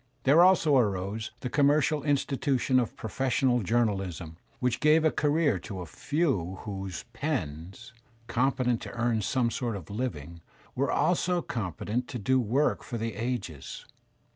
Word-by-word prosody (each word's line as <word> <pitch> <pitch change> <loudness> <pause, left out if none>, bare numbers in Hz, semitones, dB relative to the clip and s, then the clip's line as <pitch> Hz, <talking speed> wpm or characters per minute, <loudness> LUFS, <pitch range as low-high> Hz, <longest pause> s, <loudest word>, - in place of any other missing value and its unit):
There 145 +5 +6
also 170 -6 +5
arose 105 0 -1
the 125 - -3
commercial 145 +1 +3
institution 135 -2 +1
of 120 - -2
professional 125 +2 0
journalism 95 -7 -1 0.2
which 125 -2 0
gave 155 +1 +4
a 155 - +4
career 145 - +1
to 95 0 -7
a - - -5
few 100 - -1
whose 95 -3 -5
pens, 95 - -4 0.3
competent 125 0 +1
to - - -7
earn 120 -2 0
some 120 +3 0
sort 120 -3 -2
of 95 -2 -8
living, 85 - -4 0.3
were 140 +2 0
also 180 +1 +1
competent 110 +4 -3
to - - -5
do 130 +5 +2
work 130 +6 +1
for 120 - -5
the 115 0 -3
ages. 110 - -5
120 Hz, 140 wpm, -28 LUFS, 100-140 Hz, 0.3 s, There